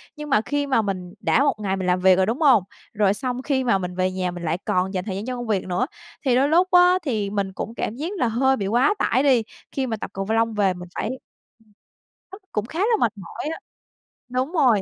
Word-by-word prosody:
Nhưng 300 -1 -7
mà 215 -6 +4
khi 290 +4 -2
mà 260 -4 +3
mình 185 -3 -4
đã - - +3
một 290 - +2
ngày 195 -2 -1
mình 185 -1 -3
làm 180 0 +2
việc 185 0 +6
rồi, 190 +1 +2
đúng 235 - -2
hông? 260 - +6 0.3
Rồi 205 -2 +3
xong 250 +2 -3
khi 265 -1 0
mà 235 -6 +3
mình 180 -1 -5
về 185 0 +1
nhà 185 -1 -2
mình 175 0 -8
lại 165 +1 0
còn 185 +2 0
dành 185 -1 -2
thời 195 -3 -4
gian 200 +3 -4
cho 255 0 -3
công 245 -1 -5
việc 205 -4 0
nữa, 185 +7 0 0.4
thì 255 -2 +3
đôi 270 +3 +3
lúc 350 +4 +4
á 360 0 +6
thì 215 -8 -1
mình 195 -2 -2
cũng 225 - -5
cảm 220 - -3
giác 295 +6 -4
là 250 - +1
hơi 265 +4 +2
bị 195 - -2
quá 245 - +3
tải 260 +4 +2
đi, 260 -5 +4 0.3
khi 265 -2 -2
mà 225 -2 -2
tập - - -6
cầu 195 0 -3
v 215 - -3
lông 225 0 +2
về 200 -3 +2
mình 180 0 -9
phải - - -2 0.5
ừm, 215 - -29 0.6
thức 390 +2 -11
cũng 210 - -1
khá 320 +8 -6
là 445 +3 +3
mệt 230 - +2
mỏi 190 +8 -8
á. - - -8 0.7
Đúng 255 +4 -1
rồi. 250 - +4
225 Hz, 265 wpm, -23 LUFS, 190-265 Hz, 0.7 s, việc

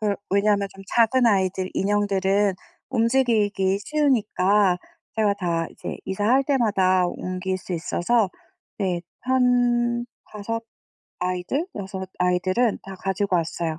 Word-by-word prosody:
그 210 -2 +1 0.2
왜냐면 200 0 +2
좀 195 - -11
작은 240 +2 +3
아이들 190 -3 +1
인형들은 200 0 +1 0.3
움직이기 225 -6 +2
쉬우니까 210 -10 +2 0.4
제가 210 -2 +2
다 170 -4 -1
이제 - - -7
이사할 210 +8 +2
때마다 195 -9 +2
옮길 185 +1 -3
수 185 - -8
있어서 180 +5 +1 0.5
네 185 -4 0 0.3
한 245 -2 +2 0.3
5 225 +2 -4 0.6
아이들, 180 - -2
6 190 -2 -6
아이들은 185 +5 +1
다 195 - -9
가지고 190 0 0
왔어요. 165 -1 -2
200 Hz, 240 characters per minute, -24 LUFS, 185-230 Hz, 0.6 s, 작은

